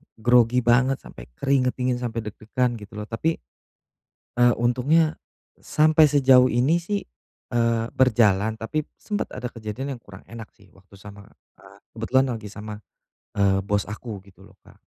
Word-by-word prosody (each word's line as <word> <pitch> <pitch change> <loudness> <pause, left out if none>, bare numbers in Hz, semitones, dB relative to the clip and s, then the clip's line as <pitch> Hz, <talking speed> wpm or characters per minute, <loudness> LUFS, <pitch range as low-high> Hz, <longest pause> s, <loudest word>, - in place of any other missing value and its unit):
grogi 120 +1 +3
banget, 130 +3 +3
sampe - - -12
keringet 130 - +1
dingin, 125 -1 -1
sampe 115 -2 -3
deg-degan 115 +3 -2
gitu, 105 -1 -13
loh, 105 - -7
tapi, 160 +9 -1 1.0
eee, 120 0 +5
untungnya 135 +7 +2 0.4
sampe 155 0 +4
sejauh 135 -3 +5
ini, 130 +9 +2
sih, 200 +4 -3 0.5
eee, 115 -1 +1
berjalan, 110 -4 +3
tapi 155 +7 -3
sempet 205 -1 -3
ada 125 -1 -5
kejadian 120 +4 -6
yang - - -31
kurang 95 -4 -14
enak, 115 -1 -9
sih, 100 -3 -23
waktu 95 +1 -22
sama, 100 0 -12 0.5
eee, - - -19 0.2
kebetulan 130 +1 +2
lagi 105 -2 -9
sama, 105 0 -8 0.6
eee, 95 -1 +2
bos 100 0 -1
aku, 105 0 -7
gitu, 95 - -18
loh, - - -19
Kak. - - -18
120 Hz, 155 wpm, -24 LUFS, 105-130 Hz, 1.0 s, eee